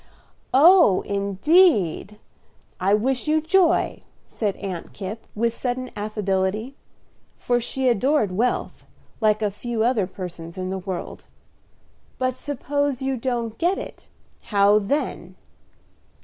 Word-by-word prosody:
"Oh, 315 - +6
indeed! 200 - +2 0.6
I 195 +2 +3
wish 255 +6 -1
you 310 +1 +3
joy," 345 +2 +2 0.2
said 205 -4 -3
Aunt 185 -4 -6
Kipp, 210 +3 -7
with 230 +2 0
sudden 255 0 -3
affability; 210 +3 -2 0.6
for 245 0 0
she 260 +2 -2
adored 250 -1 +2
wealth, 230 +7 -1 0.4
like 215 -1 +2
a 205 - +1
few 225 +2 -3
other 230 -6 +1
persons 175 -3 -8
in 185 0 -3
the 190 - -3
world. 185 -1 -6 0.9
"But 255 0 0
suppose 285 0 -2
you 265 0 0
don't 235 -2 -3
get 355 +3 +1
it, - - -9 0.4
how 205 0 +4
then?" 275 +9 -3
225 Hz, 120 wpm, -23 LUFS, 200-265 Hz, 0.9 s, Oh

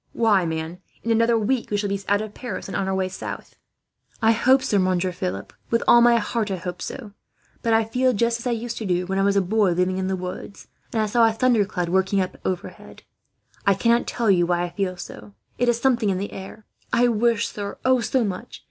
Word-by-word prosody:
"Why, 205 -6 +3
man, 160 +2 -4 0.2
in 230 - -1
another 230 +1 +3
week 230 +3 -1
we 205 - 0
shall 205 0 -1
be 200 0 -2
out 205 +1 +2
of 215 -1 -8
Paris, 235 -6 -6
and - - -6
on 190 - -1
our 190 - 0
way 190 -1 0
south." 185 - -7 0.6
"I 225 -1 +4
hope 260 +4 +3
so, 205 - +1
Monsieur 185 0 +1
Philip, 180 +1 -5 0.2
with 230 - +1
all 240 - +7
my 240 0 +6
heart 225 0 -1
I 195 - -1
hope 180 0 -6
so; 230 -6 -6 0.5
but 230 - 0
I 225 0 +4
feel 255 +3 +1
just 235 +1 0
as 235 - -5
I - - +1
used 235 0 -3
to 220 - -4
do 180 0 0
when 190 +1 -1
I - - +2
was 200 0 +2
a 200 - +4
boy 195 0 +2
living 180 +2 0
in 185 - -1
the 190 - 0
woods, 185 +2 -7 0.2
and 220 -2 +1
I - - +1
saw 230 +2 +4
a - - +2
thundercloud 215 -7 +1
working 190 +2 +2
up 185 -1 -3
overhead. 185 -2 -6 0.6
I 200 - +5
cannot 235 +4 +2
tell 230 -4 +1
you 175 -2 +3
why 175 0 +1
I 175 - -4
feel 185 -1 -2
so. 200 +3 -10 0.2
It 245 0 +2
is 235 -1 +1
something 235 -5 +2
in 190 - 0
the 200 +2 -5
air. 195 +3 -9 0.3
I 245 +1 +4
wish 230 -1 +1
sir, 200 -1 -6
oh, 260 -1 +4
so 255 +1 +1
much! 205 +3 -5
205 Hz, 235 wpm, -23 LUFS, 185-230 Hz, 0.6 s, all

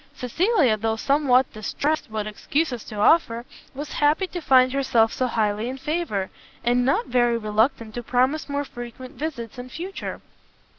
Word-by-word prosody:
Cecilia, 295 - +2
though 220 +1 0
somewhat 265 +1 +2
distressed 285 +9 -2
what 215 -1 -3
excuses 245 +4 -2
to 215 - -8
offer, 235 +1 +3 0.3
was 290 +2 -6
happy 300 +6 +2
to 360 -1 -6
find 255 -3 +5
herself 235 -5 +2
so 255 - 0
highly 220 0 0
in 260 - -5
favour, 270 - -2 0.3
and 245 +1 +2
not 270 +3 +2
very 240 -2 +2
reluctant 220 +1 0
to 240 - -4
promise 255 +6 +1
more 285 0 -1
frequent 240 +1 -9
visits 265 -6 -5
in 250 +1 -7
future. 360 +8 -6
250 Hz, 155 wpm, -24 LUFS, 225-290 Hz, 0.3 s, find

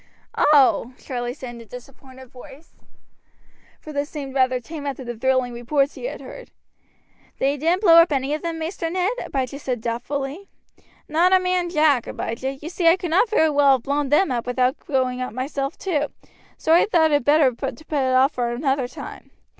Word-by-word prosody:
"Oh!" 265 -3 +4
Charlie 245 -2 -5
said 255 -4 -8
in 235 - -10
a - - -13
disappointed 260 +2 -13
voice, 270 +4 -14 1.1
for 305 - -10
this 285 +1 -2
seemed 280 -3 -7
rather 255 -1 +2
tame 285 +4 -8
after 270 -1 -4
the 240 -1 -6
thrilling 255 +1 0
reports 275 +4 0
he - - -8
had - - -5
heard. - - -11 0.9
"Then 270 - +1
you 290 - -4
didn't 345 +7 +1
blow 335 -4 +7
up 335 -1 +6
any 275 0 0
of 305 - -4
'em, 335 -1 -3
Maister 330 +1 -4
Ned," 370 +5 0
Abijah 270 0 -3
said 255 -4 -3
doubtfully. 270 - -4 0.6
"Not 340 +5 +3
a 375 - +6
man 365 -1 0
jack, 300 -7 +2
Abijah. 260 +4 -4
You 295 +4 -9
see 350 -1 0
I 335 +2 +6
could 350 -3 -5
not 390 +7 +3
very 320 -8 +3
well 285 -1 +5
have 255 -3 -1
blown 285 0 -1
them 295 +2 +3
up 240 -1 -2
without 250 +1 0
going 255 -2 0
up 255 - -4
myself 275 +2 -3
too, 300 -6 -1 0.5
so 320 - +1
I 345 - +5
thought 325 -6 +3
it 290 -3 +2
better 290 -1 +4
to - - -16
put - - -5
it 270 -5 0
off 265 +3 +4
for 240 -3 -2
another 265 +1 -1
time." 250 - -10
280 Hz, 200 wpm, -22 LUFS, 255-320 Hz, 1.1 s, blow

